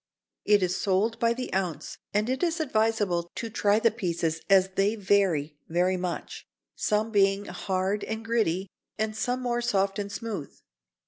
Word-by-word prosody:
It 205 -2 +4
is 180 +1 0
sold 210 +4 +1
by 230 0 +3
the 250 -3 -5
ounce, 180 -6 -3
and 210 +1 +1
it 260 +1 -1
is 340 -1 +1
advisable 215 - +1
to 230 -1 -4
try 205 0 +3
the 225 0 +3
pieces 170 -6 -2
as 190 -1 +5
they 195 +3 +1
vary 185 -8 +1
very 180 +3 +2
much, 180 -1 -5 0.3
some 215 +1 0
being 195 -1 +3
hard 190 +2 -2
and 220 +1 -5
gritty 200 -5 +1 0.3
and 215 0 -1
some 250 +3 -1
more 240 -1 0
soft 200 -4 +1
and 200 0 -4
smooth. 200 - -5
205 Hz, 165 wpm, -27 LUFS, 185-225 Hz, 0.3 s, as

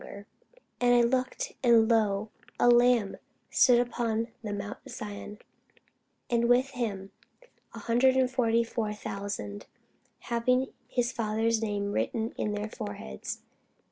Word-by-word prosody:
[Sidenote: - - -10
Rev. 200 0 -11 0.3
17] - - -26 0.2
And 245 0 +5 0.2
I - - +6
looked, 430 - -4
and, 235 -3 +5
lo, 215 -2 +1 0.3
a - - +4
Lamb 240 -4 +4 0.3
stood 245 -1 +4
on 230 -1 0
the 215 -3 -5
mount 205 0 -5
Sion, 205 0 -7 0.9
and 235 0 +1
with 255 +2 +3
him 205 -7 -4 0.6
an - - -7
hundred 260 +2 +3
forty 235 -3 +2
and 230 - -4
four 215 -3 -2
thousand, 200 - -6 0.5
having 250 +3 0
his 245 -1 0
Father's 225 0 0
name 205 -2 -2
written 225 +2 -1
in 210 - -2
their 210 +1 -3
foreheads. 85 - -7
230 Hz, 140 wpm, -29 LUFS, 205-245 Hz, 0.9 s, I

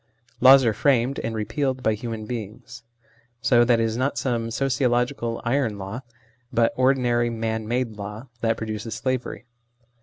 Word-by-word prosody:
Laws 135 +1 +8
are 115 - +3
framed, 130 +2 +1
and 115 0 -3
repealed, 130 +4 -2
by 110 - +2
human 110 0 -5
beings. 115 +1 -7 0.6
So 120 0 +4
that 120 -1 +3
it - - +2
is 115 0 -1
not 130 +3 -1
some 115 -3 -1
sociological 125 -1 0
"iron" 120 -4 0
law, 100 +6 -6 0.5
but 115 0 +2
ordinary 125 -2 +2
man 110 -1 -3
made 120 -2 -2
law, 105 +4 -7
that 115 0 0
produces 110 0 -5
slavery. 125 -1 -3
120 Hz, 150 wpm, -24 LUFS, 110-130 Hz, 0.6 s, Laws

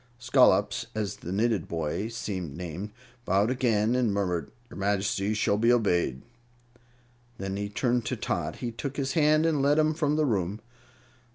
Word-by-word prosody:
Scollops, 125 -6 +3
as 105 -3 -2
the 85 - -7
knitted 105 -2 0
boy 85 +5 -2
seemed 95 -9 -5
named, 90 +3 -5 0.3
bowed 100 +4 +2
again 115 -3 +1
and 125 -4 +2
murmured, 90 -6 -1 0.2
"Your - - -9
Majesty 100 +1 0
shall 105 -1 +1
be 115 +3 +4
obeyed." 90 - +1 1.1
Then, 95 0 -4 0.2
turning 125 -1 +1
to - - -3
Tot, - - -2
he 120 - -4
took 135 +4 -5
his 135 -2 -1
hand 155 0 +4
and 155 -4 +2
led 145 +2 +3
him 155 0 +3
from 150 -2 0
the 155 0 +2
room. 100 -4 -1
110 Hz, 160 wpm, -27 LUFS, 95-130 Hz, 1.1 s, be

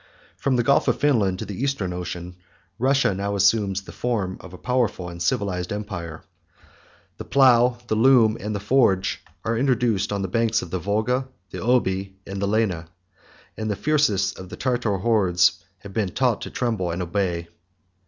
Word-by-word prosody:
From 135 -2 0
the 120 - +2
Gulf 140 +4 +3
of - - +1
Finland 110 -11 +2
to - - -5
the 100 +4 -6
Eastern 120 -10 -1
Ocean, 90 0 -6 0.4
Russia 135 -3 +3
now 100 +1 -2
assumes 100 -1 +2
the - - -10
form 105 -7 -2
of 95 - -12
a 90 - -10
powerful 120 -7 -1
and 85 0 -9
civilized 90 0 -1
empire. 90 -6 -5 0.9
The - - -6
plough, 125 -2 +4
the 110 - -2
loom, 115 -1 +5
and 105 +1 -4
the - - -2
forge, 100 -3 +2 0.2
are 115 +1 0
introduced 120 -5 +1
on 100 -1 -1
the - - -1
banks 115 +4 +1
of 85 - -9
the 95 - -1
Volga, 110 +8 0 0.2
the - - -6
Oby, 95 -6 0
and 100 0 -5
the 100 - +1
Lena; 100 -6 0 0.7
and 110 0 -4
the 105 - 0
fiercest 100 -6 +1
of 95 -1 -9
the - - -8
Tartar 120 -6 0
hordes 95 -4 +2 0.2
have 100 -1 -10
been 105 -3 0
taught 125 +3 0
to - - -5
tremble 110 -8 -1
and 85 +2 -2
obey. 85 -2 -2
100 Hz, 180 wpm, -23 LUFS, 95-120 Hz, 0.9 s, loom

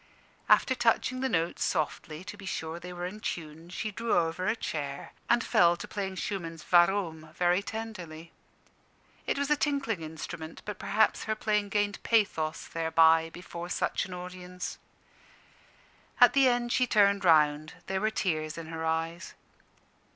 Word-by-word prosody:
After 260 - +5
touching 245 +1 +1
the 265 0 0
notes 165 -3 0
softly, 155 0 -2
to 205 - -8
be 195 -2 -10
sure 160 -1 -4
they 180 +1 -8
were 175 0 -5
in 200 +4 -6
tune, 165 -3 -6
she 215 +4 -4
drew 230 +1 0
over 170 +2 0
a - - +2
chair, 140 -9 -5 0.2
and 240 -1 +4
fell 175 0 +4
to 210 - -7
playing 195 -2 -4
Schumann's 170 -4 -5
"Warum?" 175 -3 +3
very 180 +1 +2
tenderly. 185 -8 -7 1.0
It - - 0
was 280 +1 -1
a - - +6
tinkling 280 - -1
instrument, 160 0 -7
but 210 - -6
perhaps 215 +2 +2
her 215 - -1
playing 210 -1 0
gained 205 0 0
pathos 195 -9 +1
thereby, 160 0 +4
before 175 0 -8
such - - -1
an 185 - -8
audience. 180 0 -7 1.4
At 245 -2 +8
the 275 -2 +5
end 240 -1 +1
she 250 - +3
turned 200 -2 +4
round: 155 -2 +3
there 190 0 -2
were 215 - +2
tears 155 -7 -2
in 165 -1 -7
her 160 0 -5
eyes. 165 +2 -2
180 Hz, 160 wpm, -29 LUFS, 165-210 Hz, 1.4 s, At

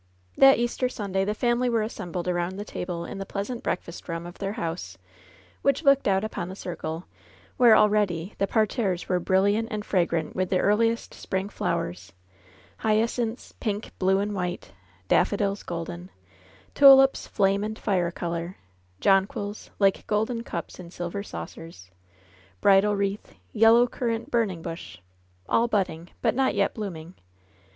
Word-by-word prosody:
That 270 0 +7
Easter 240 +2 0
Sunday 195 -5 -2
the 210 +1 -1
family 240 +2 +1
were 230 -2 +1
assembled 180 -5 -5
around 175 +1 -1
the 205 - -5
table 175 -4 -5
in - - -7
the - - -3
pleasant 230 +5 -4
breakfast 175 -5 -4
room 165 0 -4
of 175 +1 -10
their 195 0 -2
house, 165 - -5 0.6
which 275 +3 +1
looked 275 -4 +4
out 195 0 +2
upon 210 -4 -4
the 190 - -7
circle, 170 -2 -5 0.5
where 235 -3 +7
already 205 -4 +2
the 195 - +2
parterres 215 -4 0
were 180 -1 +1
brilliant 200 +5 +2
and 215 -2 -4
fragrant 170 -4 0
with 185 -1 -1
the - - +1
ear 205 +3 +3
liest 230 +1 0
spring 190 +1 -3
flowers 90 - -3 0.3
— 95 +1 -27
^hyacinths, 225 +2 0
pink, 210 -1 -3
blue 190 0 +3
and 205 +1 -1
white; 180 - -4 0.4
daffodils 200 -1 +1
golden; 170 +1 -6 0.6
tulips 270 -1 +7
flame 200 0 +1
and 215 +1 -4
fire 180 -4 0
color; 170 +1 -4 0.4
jonquils, 195 - +1
like 195 -1 +2
golden 220 +3 0
cups 170 -5 -6
in 175 -2 -9
silver 175 +3 -5
saucers, 90 - -9 0.7
bridal 200 - +4
wreath, 200 +1 -3 0.2
yellow 225 +2 +6
currant 235 +1 -3
burning 200 -8 0
bush 165 - -7 0.3
— 90 0 -36
all 235 - +3
budding, 185 -6 -1
but - - +3
not 265 +2 +1
yet 200 -1 +1
bloom 205 -5 -5
ing. 160 +3 -10
195 Hz, 155 wpm, -26 LUFS, 175-220 Hz, 0.7 s, That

